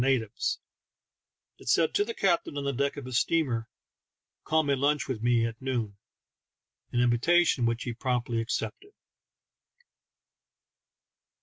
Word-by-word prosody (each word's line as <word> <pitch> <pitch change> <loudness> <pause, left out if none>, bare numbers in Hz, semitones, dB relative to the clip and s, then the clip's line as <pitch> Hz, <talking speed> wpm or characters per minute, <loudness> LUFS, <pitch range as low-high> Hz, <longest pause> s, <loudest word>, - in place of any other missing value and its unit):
natives; 120 -5 0 1.0
it - - -7
said - - +3
to 410 - +3
the 455 +2 -5
captain 170 -6 +1
on 140 - -2
the 140 0 -1
deck 140 +3 -1
of 140 - -6
his 125 -2 +1
steamer, 130 -9 0 0.4
" - - -62
Come 160 -1 +3
and 135 -1 0
lunch 145 +1 +2
with 125 -5 -3
me 120 -1 +3
at 115 +1 -5
noon 120 -6 -2 0.3
" - - -63
— - - -50
an 120 - +1
invitation 125 +2 +3
which 115 0 -1
he 120 - -3
promptly 120 -1 -1
accepted. 405 - -4
130 Hz, 145 wpm, -28 LUFS, 115-145 Hz, 1.0 s, said